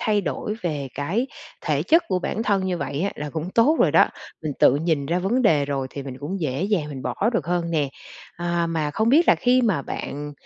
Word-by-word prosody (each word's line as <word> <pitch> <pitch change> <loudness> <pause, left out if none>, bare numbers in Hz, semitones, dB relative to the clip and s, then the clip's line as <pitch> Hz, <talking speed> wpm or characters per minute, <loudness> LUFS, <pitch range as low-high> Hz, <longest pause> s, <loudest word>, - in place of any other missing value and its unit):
thay 210 -2 +2
đổi 210 +2 -3
về 150 -5 -2
cái 190 - -1 0.3
thể - - 0
chất 330 +2 +4
của 185 -2 +1
bản 220 +4 -2
thân 200 -4 +1
như 180 -2 -1
vậy 145 +1 -3
á 200 +3 0
là 150 0 -5
cũng 160 +3 -4
tốt 255 +10 +4
rồi - - +5
đó. - - +6 0.3
Mình 155 - -2
tự 130 - +6
nhìn 155 -3 0
ra 175 +3 +1
vấn 225 +8 +1
đề 150 -9 +4
rồi 140 -2 -2
thì 140 - -6
mình 130 -1 -8
cũng 180 +6 -4
dễ 140 +1 -1
dàng 195 -7 0
mình 135 -3 -7
bỏ - - -3 0.2
được 160 -8 -1
hơn 175 -1 -1
nè. 150 -4 +1 0.5
À, 175 0 0
mà 160 -3 -1
không 220 +8 0
biết 315 +7 +4
là - - +8
khi 250 +1 +3
mà 195 -11 +1
bạn, 145 +2 -5
170 Hz, 240 wpm, -23 LUFS, 145-205 Hz, 0.5 s, là